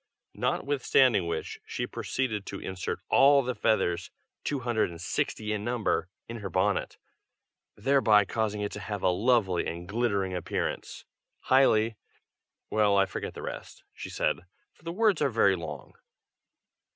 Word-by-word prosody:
Notwithstanding 130 Hz, -8 st, +2 dB
which, 85 Hz, -, -4 dB
she -, -, -3 dB
proceeded 110 Hz, -6 st, -2 dB
to 100 Hz, -, -5 dB
insert 95 Hz, -1 st, -4 dB
all 140 Hz, 0 st, +6 dB
the 125 Hz, +1 st, -2 dB
feathers 90 Hz, -7 st, 0 dB, 0.3 s
two 140 Hz, -2 st, -2 dB
hundred 115 Hz, -5 st, +1 dB
and 85 Hz, -1 st, -10 dB
sixty 105 Hz, +5 st, -2 dB
in 105 Hz, -1 st, -3 dB
number 120 Hz, -5 st, 0 dB, 0.2 s
in 115 Hz, -, -6 dB
her 100 Hz, -3 st, -5 dB
bonnet; -, -, 0 dB, 0.8 s
thereby 110 Hz, -3 st, +4 dB
causing 105 Hz, 0 st, -2 dB
it 105 Hz, -, -2 dB
to -, -, -6 dB
have 105 Hz, 0 st, -5 dB
a 95 Hz, -, +4 dB
lovely 100 Hz, -2 st, +2 dB
and 85 Hz, +1 st, -5 dB
glittering 100 Hz, -3 st, 0 dB
appearance, 90 Hz, -2 st, -3 dB, 0.4 s
highly 115 Hz, -4 st, +3 dB, 0.7 s
well, 105 Hz, -2 st, +3 dB
I 95 Hz, -, +5 dB
forget 95 Hz, -, -6 dB
the -, -, -7 dB
rest," -, -, -7 dB
said -, -, -1 dB
she, 90 Hz, +1 st, -29 dB
"for -, -, -28 dB
the 165 Hz, +1 st, -5 dB
words 215 Hz, +2 st, +2 dB
are -, -, +3 dB
very 100 Hz, -5 st, +3 dB
long." 80 Hz, -6 st, -7 dB
105 Hz, 150 wpm, -28 LUFS, 95-125 Hz, 0.8 s, all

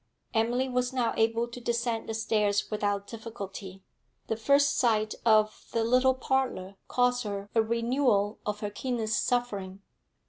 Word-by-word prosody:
Emily 240 Hz, +3 st, +1 dB
was 250 Hz, 0 st, 0 dB
now 250 Hz, -3 st, 0 dB
able 225 Hz, +1 st, +1 dB
to 240 Hz, +1 st, -9 dB
descend 235 Hz, -1 st, -1 dB
the 225 Hz, -, -2 dB
stairs 210 Hz, -2 st, +1 dB
without 205 Hz, -1 st, -1 dB
difficulty. 200 Hz, -4 st, -8 dB, 0.5 s
The 225 Hz, -, +1 dB
first 280 Hz, +5 st, +3 dB
sight 215 Hz, -3 st, +2 dB
of 215 Hz, -1 st, +3 dB
the 230 Hz, -, +1 dB
little 255 Hz, +3 st, +4 dB
parlour 260 Hz, -8 st, -1 dB
cost 245 Hz, 0 st, +2 dB
her 200 Hz, -1 st, -5 dB
a 225 Hz, -, +4 dB
renewal 230 Hz, -2 st, +1 dB
of 210 Hz, 0 st, -3 dB
her 205 Hz, -1 st, -3 dB
keenest 225 Hz, -2 st, -1 dB
suffering. 200 Hz, -6 st, -2 dB
225 Hz, 145 wpm, -28 LUFS, 210-245 Hz, 0.5 s, little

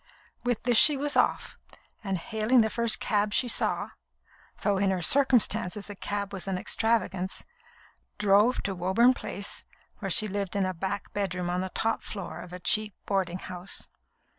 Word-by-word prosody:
With 245 Hz, -2 st, -1 dB
this 245 Hz, -2 st, +5 dB
she 295 Hz, -2 st, +7 dB
was 290 Hz, +2 st, 0 dB
off, -, -, 0 dB, 0.4 s
and, 195 Hz, -2 st, -2 dB
hailing 220 Hz, +6 st, +1 dB
the 220 Hz, -1 st, 0 dB
first 235 Hz, -2 st, +2 dB
cab 205 Hz, 0 st, 0 dB
she 250 Hz, -, +2 dB
saw 235 Hz, -, +1 dB, 0.7 s
(though 200 Hz, -2 st, +1 dB
in 200 Hz, 0 st, +2 dB
her 185 Hz, -2 st, -1 dB
circumstances 220 Hz, -, +3 dB
a -, -, -8 dB
cab 200 Hz, 0 st, -4 dB
was 195 Hz, 0 st, -6 dB
an 190 Hz, -1 st, -1 dB
extravagance), 195 Hz, -2 st, -1 dB, 0.7 s
drove 210 Hz, +4 st, +3 dB
to 200 Hz, -, -2 dB
Woburn 190 Hz, +8 st, +3 dB
Place, 200 Hz, -5 st, -5 dB, 0.4 s
where -, -, -4 dB
she 215 Hz, -, +5 dB
lived 200 Hz, -1 st, -4 dB
in 200 Hz, -1 st, +1 dB
a 185 Hz, -, -2 dB
back 190 Hz, +3 st, -5 dB
bedroom 180 Hz, -3 st, -2 dB
on 180 Hz, +1 st, -1 dB
the 190 Hz, -, -4 dB
top 225 Hz, +4 st, -1 dB
floor 180 Hz, -5 st, -7 dB
of 180 Hz, -, -11 dB
a 180 Hz, -, -8 dB
cheap 210 Hz, +4 st, +1 dB
boarding 185 Hz, -3 st, -1 dB
house. 180 Hz, 0 st, -6 dB
200 Hz, 170 wpm, -27 LUFS, 185-220 Hz, 0.7 s, she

